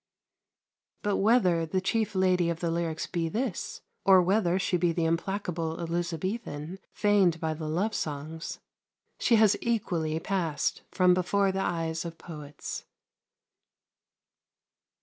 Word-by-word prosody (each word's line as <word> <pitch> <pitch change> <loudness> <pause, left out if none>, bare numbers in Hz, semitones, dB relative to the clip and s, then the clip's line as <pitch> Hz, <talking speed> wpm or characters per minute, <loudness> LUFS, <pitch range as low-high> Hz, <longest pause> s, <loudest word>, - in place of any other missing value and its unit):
But 205 -1 +1
whether 195 -6 +4
the 175 +4 0
chief 210 +2 0
Lady 185 -2 +3
of 170 -1 -2
the 170 -2 -1
lyrics 165 -1 -1
be 165 -1 -2
this, 230 +2 -3 0.2
or 190 -1 +7
whether 185 0 +2
she 190 -1 0
be 175 -1 +2
the 165 0 0
implacable 165 -1 -1
Elizabethan 170 0 -3
feigned 200 -5 +3
by 160 -1 -1
the 155 0 -5
love 185 +8 0
songs, 155 +2 -4 0.6
she 235 - +4
has 215 -2 +5
equally 170 -9 0
passed 165 -5 -1
from 180 -1 +4
before 190 +2 +2
the 190 - -2
eyes 165 -3 -1
of 165 -1 -7
poets. 150 -3 -7
175 Hz, 130 wpm, -28 LUFS, 165-195 Hz, 0.6 s, or